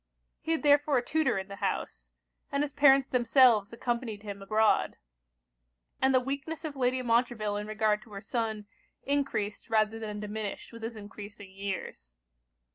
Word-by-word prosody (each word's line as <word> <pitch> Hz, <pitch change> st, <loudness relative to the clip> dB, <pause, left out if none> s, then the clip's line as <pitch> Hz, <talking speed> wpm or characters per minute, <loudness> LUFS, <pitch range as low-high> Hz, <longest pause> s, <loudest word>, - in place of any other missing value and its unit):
He 325 Hz, -, 0 dB
had 320 Hz, -, -2 dB
therefore 290 Hz, -1 st, +4 dB
a 245 Hz, -, 0 dB
tutor 315 Hz, -8 st, +1 dB
in 190 Hz, 0 st, -4 dB
the 200 Hz, -1 st, -9 dB
house; -, -, -3 dB, 0.4 s
and 280 Hz, +1 st, +1 dB
his 290 Hz, -, -3 dB
parents 275 Hz, -1 st, +5 dB
themselves 240 Hz, -3 st, +4 dB
accompanied 235 Hz, -3 st, -3 dB
him 200 Hz, -2 st, -7 dB
abroad. 215 Hz, +2 st, +2 dB, 1.1 s
And 265 Hz, -, +4 dB
the 260 Hz, -, +5 dB
weakness 280 Hz, +5 st, -4 dB
of 300 Hz, -2 st, -5 dB
Lady 255 Hz, -1 st, +1 dB
Montreville 230 Hz, -3 st, +1 dB
in 210 Hz, 0 st, -4 dB
regard 215 Hz, -1 st, +1 dB
to 215 Hz, -, -17 dB
her 200 Hz, -, -5 dB
son, 220 Hz, -3 st, -2 dB, 0.4 s
encreased 270 Hz, -8 st, -1 dB
rather 220 Hz, 0 st, +2 dB
than 210 Hz, -2 st, -5 dB
diminished 210 Hz, +1 st, -5 dB
with 230 Hz, -, -10 dB
his 225 Hz, +1 st, -5 dB
encreasing 205 Hz, -1 st, -10 dB
years. 190 Hz, -, -6 dB
225 Hz, 160 wpm, -29 LUFS, 210-265 Hz, 1.1 s, parents